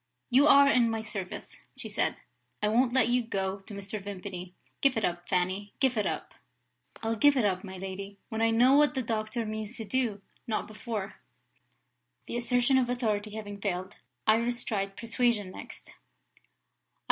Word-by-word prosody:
"You 275 +4 +6
are 280 -1 +8
in 245 -4 +4
my 225 -1 -2
service," 205 -3 -6 0.2
she - - -6
said; - - 0 0.4
"I 210 - +1
won't 240 +3 +3
let 250 -2 +3
you 245 +1 +3
go 195 -4 -2
to 200 +2 -12
Mr. 200 +1 -5
Vimpany. 185 -2 -7 0.3
Give 275 -4 +4
it 220 - +2
up, 175 0 -3
Fanny! 185 +3 -1
Give 265 -3 +3
it 210 - +1
up!" - - -4 0.7
"I'll 225 0 0
give 285 +5 +5
it 240 - +3
up, 185 -2 0
my 190 - -7
lady, 195 +1 -6
when 220 0 -2
I 225 - +4
know 240 +4 +5
what 295 +1 +5
the 260 - 0
doctor 220 +1 -2
means 215 +1 -5
to 225 - -5
do 220 -4 -1 0.2
not 220 - -1
before." 215 -2 -5 1.1
The - - -5
assertion 245 +2 +3
of 245 -2 0
authority 215 -4 -1
having 205 -2 -6
failed, 185 -1 -3 0.3
Iris 235 +2 +2
tried 195 -3 -2
persuasion 230 -4 0
next. - - -10
220 Hz, 170 wpm, -29 LUFS, 200-245 Hz, 1.1 s, are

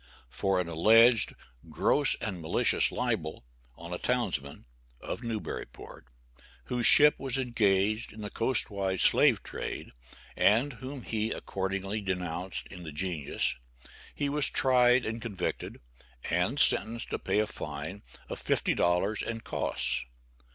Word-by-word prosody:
For 95 -1 0
an 90 - -2
alleged 110 +8 +5 0.3
"gross - - +1
and 95 -5 -5
malicious 80 - +2
libel" 80 -5 -3 0.3
on 85 +4 -9
a 90 - -4
townsman 95 - -2 0.3
(of - - -6
Newburyport) 115 - -7 0.6
whose 125 -2 +1
ship 150 0 +8
was 135 -1 -2
engaged 110 -4 +1
in 110 - -11
the 105 - -6
coastwise 100 -6 -1
slave - - +4
trade, - - -6 0.4
and 120 +7 +3
whom 130 +1 -8
he 110 0 -2
accordingly 95 +1 -3
denounced 90 -1 -4
in 90 -2 -9
the 80 -3 -8
"Genius," 80 -2 -2 0.6
he 145 - -1
was 145 0 +2
tried 125 -1 +3
and 115 +1 -4
convicted, 100 -6 -4 0.5
and 90 - 0
sentenced 115 +1 +1
to - - -2
pay - - -1
a 105 - +3
fine 90 -1 -7 0.3
of - - -7
$50 90 +5 +1
and 115 0 -5
costs. - - -2
105 Hz, 130 wpm, -29 LUFS, 90-120 Hz, 0.6 s, ship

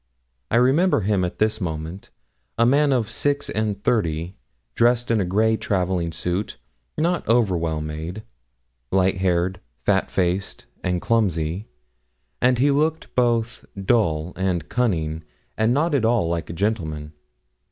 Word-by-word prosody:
I - - 0
remember 135 +6 +4
him 100 -1 +1
at 90 - -3
this 110 0 +1
moment 80 +2 -5 0.5
a 115 - +4
man 140 +3 +4
of 120 -5 0
six 145 0 -1
and 105 -2 -2
thirty 85 -6 0 0.4
dressed 120 0 +2
in 110 -3 +3
a - - 0
grey 110 +5 +2
travelling 90 -4 -1
suit, 90 +5 -3 0.4
not 170 +3 +1
over 115 -5 +3
well 80 -2 -1
made; 80 +7 -5 0.7
light 95 0 +2
haired, 90 0 0 0.3
fat - - +2
faced, 95 +1 -1 0.2
and 90 -1 0
clumsy; 95 -4 0 0.7
and 125 0 +4
he 140 +4 +3
looked 155 +3 0
both 120 -2 +1 0.2
dull 90 -6 +1
and 90 -5 -1
cunning, 80 -10 0 0.3
and 110 +1 +2
not 150 +5 +1
at 135 -5 +2
all 115 -6 +2
like 85 -2 -2
a - - -4
gentleman. 80 -6 -2
100 Hz, 140 wpm, -23 LUFS, 85-120 Hz, 0.7 s, remember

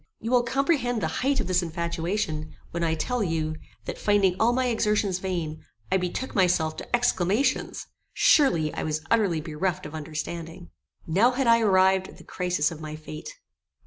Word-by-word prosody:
You 225 - -4
will 250 -1 +5
comprehend 250 -1 +1
the - - -1 0.2
height 275 +2 +2
of - - 0
this 185 0 +2
infatuation, 170 -1 -3 0.2
when 170 0 -2
I 160 -1 +1
tell 250 +9 -1
you, 160 -3 -1 0.3
that, - - -5
finding 200 -3 +3
all 230 +2 +4
my 255 +1 +1
exertions 210 -5 +1
vain, 170 -5 -3 0.3
I 190 - +4
betook 185 +8 -3
myself 175 -4 +2
to - - -1
exclamations. 225 0 +1 0.3
Surely 170 - +4
I - - -3
was 155 0 -3
utterly 200 -8 +2
bereft 165 +3 -2
of 150 - -8
understanding. 160 - -6 0.3
Now 195 +9 +4
had 255 +1 -1
I 230 0 +6
arrived 190 -3 +3
at - - -14
the - - -14
crisis 180 -3 -1
of 160 -1 -8
my 155 0 -6
fate. 155 0 -8
180 Hz, 175 wpm, -26 LUFS, 160-225 Hz, 0.3 s, I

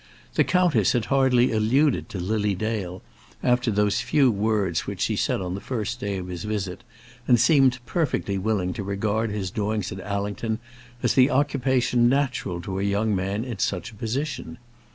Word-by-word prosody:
The - - +4
countess 175 - +3
had 120 -3 0
hardly 130 -2 +4
alluded 120 +6 +2
to 95 - -5
Lily 105 +2 0
Dale 95 -3 -3 0.4
after 125 -1 +2
those 105 +1 +1
few 130 +1 +3
words 105 -4 0
which - - -5
she - - +1
said - - 0
on 90 -1 -3
the 100 - -5
first 120 -1 -3
day 100 -1 -2
of 90 - -5
his 90 -2 -6
visit, 100 -4 -3 0.4
and 120 -2 +5
seemed 130 0 +4
perfectly 125 - -1
willing 95 -3 0
to 100 - -5
regard 105 +3 -1
his 100 -3 -3
doings 105 -1 -2
at 95 - -6
Allington 105 +2 -2 0.5
as - - +3
the 130 +1 +5
occupation 130 -3 +2
natural 125 -10 0
to 95 +2 -4
a - - -1
young 100 +1 +1
man 100 +4 -2
in 120 -6 -6
such 90 -1 -1
a - - -15
position. 125 +3 -4
110 Hz, 175 wpm, -24 LUFS, 100-125 Hz, 0.5 s, and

